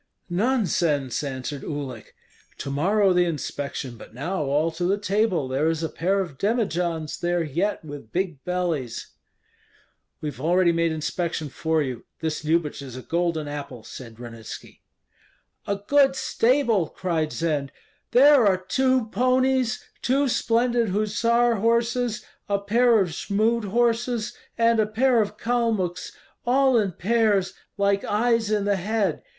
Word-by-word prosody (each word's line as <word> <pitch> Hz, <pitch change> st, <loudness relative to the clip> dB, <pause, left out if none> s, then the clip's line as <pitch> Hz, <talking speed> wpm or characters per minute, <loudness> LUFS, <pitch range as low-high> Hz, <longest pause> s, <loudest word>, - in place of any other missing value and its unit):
"Nonsense!" 175 Hz, -, +1 dB
answered 135 Hz, 0 st, -4 dB
Uhlik. 135 Hz, -7 st, -6 dB, 0.4 s
"To 140 Hz, -, -5 dB
morrow 190 Hz, +7 st, +3 dB
the 180 Hz, 0 st, +3 dB
inspection, 140 Hz, -5 st, -4 dB
but 110 Hz, -, -13 dB
now 175 Hz, +8 st, -2 dB
all 150 Hz, +4 st, +1 dB
to 165 Hz, +2 st, -3 dB
the 195 Hz, +3 st, +2 dB
table; 200 Hz, -7 st, 0 dB
there 135 Hz, +5 st, +1 dB
is 165 Hz, 0 st, -2 dB
a 160 Hz, -, -1 dB
pair 195 Hz, +4 st, 0 dB
of 150 Hz, -8 st, -7 dB
demijohns 175 Hz, -8 st, -1 dB
there 175 Hz, 0 st, 0 dB
yet 170 Hz, +5 st, -2 dB
with 145 Hz, -7 st, -9 dB
big 175 Hz, -6 st, -2 dB
bellies." 170 Hz, -10 st, -2 dB, 1.1 s
"We 150 Hz, -, -3 dB
have 130 Hz, -, -10 dB
already 175 Hz, +3 st, +3 dB
made 165 Hz, 0 st, +1 dB
inspection 160 Hz, 0 st, -2 dB
for 160 Hz, +2 st, 0 dB
you. 125 Hz, -4 st, -5 dB, 0.2 s
This 160 Hz, -1 st, -2 dB
Lyubich 155 Hz, -2 st, 0 dB
is 130 Hz, -3 st, -8 dB
a 130 Hz, -, -8 dB
golden 170 Hz, -3 st, -1 dB
apple," 140 Hz, -5 st, -7 dB
said 115 Hz, -2 st, -10 dB
Ranitski. 115 Hz, -2 st, -9 dB, 0.9 s
"A 200 Hz, -, +1 dB
good 270 Hz, +7 st, +3 dB
stable!" 240 Hz, -, +2 dB
cried 165 Hz, -4 st, -2 dB
Zend; 150 Hz, -4 st, -1 dB, 0.4 s
"there 270 Hz, -2 st, +6 dB
are 190 Hz, -2 st, +4 dB
two 255 Hz, +6 st, +1 dB
ponies, 255 Hz, 0 st, +1 dB, 0.2 s
two 275 Hz, +3 st, +2 dB
splendid 235 Hz, -1 st, +1 dB
hussar 230 Hz, +4 st, +2 dB
horses, 235 Hz, +1 st, +1 dB, 0.2 s
a 200 Hz, -, +2 dB
pair 230 Hz, +3 st, +3 dB
of 185 Hz, -, 0 dB
Jmud 215 Hz, +7 st, 0 dB
horses, 235 Hz, +1 st, 0 dB, 0.2 s
and 230 Hz, 0 st, +3 dB
a 215 Hz, -, +3 dB
pair 235 Hz, +2 st, +3 dB
of 205 Hz, 0 st, -3 dB
Kalmuks, 225 Hz, -7 st, -1 dB, 0.3 s
all 260 Hz, +1 st, +3 dB
in 200 Hz, -4 st, -1 dB
pairs, 200 Hz, -1 st, +1 dB, 0.2 s
like 200 Hz, 0 st, +2 dB
eyes 230 Hz, 0 st, +1 dB
in 210 Hz, -2 st, +1 dB
the 200 Hz, -1 st, +2 dB
head. 210 Hz, +2 st, -1 dB
190 Hz, 145 wpm, -24 LUFS, 155-230 Hz, 1.1 s, there